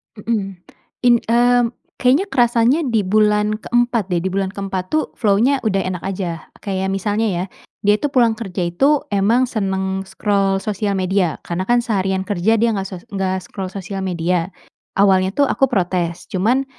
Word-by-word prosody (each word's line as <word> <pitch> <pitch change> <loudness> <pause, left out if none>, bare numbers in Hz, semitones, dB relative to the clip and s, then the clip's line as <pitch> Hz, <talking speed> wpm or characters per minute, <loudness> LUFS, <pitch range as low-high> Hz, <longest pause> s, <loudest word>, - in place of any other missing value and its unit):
Mmm. 210 -3 -3 0.5
In 240 -1 +5
mmm, 240 +1 +3 0.3
kayaknya 265 +9 +3
kerasanya 240 +3 +3
di 225 -3 +1
bulan 210 +1 +2
ke-4 240 -3 0
deh, 175 -2 0
di 190 - 0
bulan 195 0 -1
ke-4 195 -2 -3
tuh 310 - +3 0.2
flow-nya 230 +6 +3
udah 195 -3 +1
enak 185 -2 -4
aja. 180 -4 -4 0.2
Kayak 190 -1 -2
misalnya 205 +3 0
ya, 180 -3 -1 0.4
dia 205 0 +5
itu 290 - 0
pulang 240 -4 +3
kerja 190 -5 -4
itu 275 - +2
emang 210 +6 +3
senang 190 -2 -2
scroll 195 0 0
sosial 210 -1 -1
media 185 -3 0
karena 175 +2 -3
kan 240 0 +3
seharian 190 -4 0
kerja 205 +3 +1
dia 230 +2 +2
enggak 195 -1 -2
sos 180 -3 -9
enggak 190 -1 -2
scroll 190 -1 -6
sosial 195 0 -6
media. 175 0 -1 0.5
Awalnya 190 -1 +4
tuh 285 - +4
aku 270 -1 +1
protes, 180 -5 -1
cuman 235 +9 +1
200 Hz, 165 wpm, -19 LUFS, 190-230 Hz, 0.5 s, In